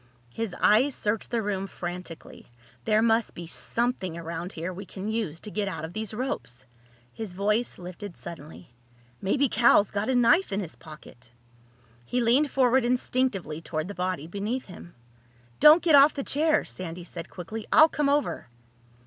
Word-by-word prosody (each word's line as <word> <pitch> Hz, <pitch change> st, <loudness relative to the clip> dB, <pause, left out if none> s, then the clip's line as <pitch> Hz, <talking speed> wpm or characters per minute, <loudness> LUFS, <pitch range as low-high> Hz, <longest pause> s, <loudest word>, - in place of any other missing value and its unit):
His 225 Hz, -5 st, -4 dB
eyes 255 Hz, +6 st, +4 dB
searched 210 Hz, +1 st, -1 dB
the 230 Hz, -2 st, -1 dB
room 195 Hz, -1 st, -2 dB
frantically. 175 Hz, -2 st, -8 dB, 0.4 s
"There 215 Hz, 0 st, +3 dB
must 225 Hz, -1 st, +2 dB
be 170 Hz, -, -7 dB
something 190 Hz, -1 st, -2 dB
around 170 Hz, +2 st, -5 dB
here 170 Hz, +3 st, -5 dB
we 190 Hz, +2 st, -9 dB
can 195 Hz, +1 st, -7 dB
use 205 Hz, -8 st, -3 dB
to 210 Hz, -, -8 dB
get 210 Hz, -1 st, -2 dB
out 160 Hz, -5 st, -4 dB
of 165 Hz, -, -9 dB
these 215 Hz, 0 st, -4 dB
ropes." 130 Hz, -, -4 dB, 0.5 s
His 215 Hz, -5 st, -7 dB
voice 210 Hz, +5 st, 0 dB
lifted 180 Hz, +2 st, -9 dB
suddenly. 165 Hz, -1 st, -10 dB, 0.5 s
"Maybe 270 Hz, +9 st, +2 dB
Cal's 220 Hz, -3 st, +4 dB
got 210 Hz, +3 st, -2 dB
a 260 Hz, -, +2 dB
knife 275 Hz, -, +4 dB
in 195 Hz, -, -1 dB
his 175 Hz, -6 st, -6 dB
pocket!" 140 Hz, -6 st, -14 dB, 0.7 s
He 245 Hz, -, -2 dB
leaned 250 Hz, +5 st, +3 dB
forward 260 Hz, -1 st, +3 dB
instinctively 240 Hz, -10 st, -1 dB
toward 155 Hz, -1 st, -4 dB
the 205 Hz, -, -6 dB
body 180 Hz, -4 st, -3 dB
beneath 205 Hz, +9 st, -3 dB
him. 175 Hz, -2 st, -12 dB, 0.6 s
"Don't 310 Hz, +3 st, +8 dB
get 335 Hz, -3 st, +3 dB
off 285 Hz, +1 st, +7 dB
the 275 Hz, -, -3 dB
chair!" 305 Hz, +3 st, +1 dB
Sandy 175 Hz, -1 st, -7 dB
said 165 Hz, -, -8 dB
quickly. 215 Hz, +5 st, -7 dB
"I'll 315 Hz, 0 st, +8 dB
come 295 Hz, -2 st, 0 dB
over." 290 Hz, -, 0 dB
205 Hz, 165 wpm, -26 LUFS, 175-245 Hz, 0.7 s, Don't